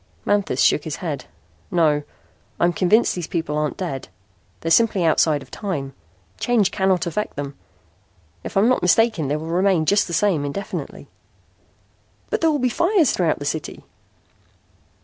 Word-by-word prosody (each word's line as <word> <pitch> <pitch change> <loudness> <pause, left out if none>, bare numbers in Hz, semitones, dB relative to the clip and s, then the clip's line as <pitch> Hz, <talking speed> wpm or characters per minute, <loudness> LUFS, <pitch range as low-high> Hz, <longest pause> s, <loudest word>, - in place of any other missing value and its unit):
Manthis 205 -1 0
shook - - +3
his - - -4
head. - - -5 0.4
"No. 160 -6 +2 0.6
I'm 175 0 +3
convinced 195 +6 +3
these 175 -3 -4
people 160 -3 -2
aren't 150 -1 -1
dead. 165 -8 -4 0.5
They're 165 - -2
simply 210 -1 +4
outside 155 -2 +2
of 130 - -20
time. 145 -10 -4 0.5
Change 220 -6 +2
cannot 190 -2 +1
affect 210 +5 -3
them. 140 0 -5 0.9
If - - -5
I'm 205 +4 +4
not 255 - +2
mistaken 195 -3 +3
they 145 - 0
will 155 +1 -5
remain 175 0 +2
just 200 +5 +3
the 170 - -6
same 175 -4 +2
indefinitely." 145 +8 -5 1.2
"But - - 0
there 325 - +4
will 300 - +1
be 255 -2 +1
fires 340 - +2
throughout 165 -4 +1
the 145 - -7
city." 155 +1 -4
175 Hz, 155 wpm, -22 LUFS, 155-205 Hz, 1.2 s, simply